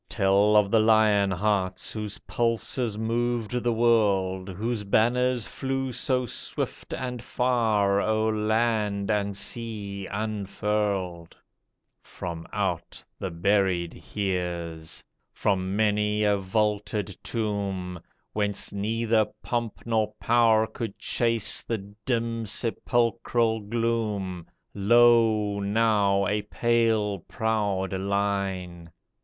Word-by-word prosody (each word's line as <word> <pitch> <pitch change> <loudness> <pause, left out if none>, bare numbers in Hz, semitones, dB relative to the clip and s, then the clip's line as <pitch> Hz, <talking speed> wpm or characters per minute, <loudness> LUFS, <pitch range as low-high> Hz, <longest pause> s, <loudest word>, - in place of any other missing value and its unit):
Tell 100 0 +3
of 105 -2 +4
the 115 - +5
lion 110 -2 +4
hearts 95 -1 0
Whose 105 -2 -4
pulses 115 -1 -1
moved 115 0 -1
the 120 -1 0
world; 100 -5 +2
Whose 110 +4 -3
banners 120 +3 +2
flew 135 -1 -3
so 125 +1 0
swift 120 - -4
and 125 -2 -4
far, 110 -5 +2
O'er 110 0 +1
land 110 -2 0
and 100 -1 -1
sea 100 -4 -3
unfurled! 100 -4 -2 0.6
From 85 -2 -7
out - - -3 0.2
the 95 - -3
buried 90 -1 +1 0.2
years. 85 -5 -3 0.3
From 95 -1 -1
many 105 0 +1
a 105 -1 +3
vaulted 105 0 -1
tomb. 100 -5 -3 0.3
Whence 105 -1 0
neither 110 +2 +1 0.2
pomp 120 -3 -3
nor 110 -2 0
power 115 -2 +4
could 110 -2 -6
chase 115 -3 +1
The 100 -3 -5
dim, 115 -2 -1
sepulchral 115 +1 0
gloom, 105 -5 -2 0.3
Lo, 110 -1 +4
now, 100 -1 +2
a 105 +2 0
pale, 110 -2 +1
proud 100 -1 -1
line. 95 -3 -2
105 Hz, 100 wpm, -26 LUFS, 100-115 Hz, 0.6 s, the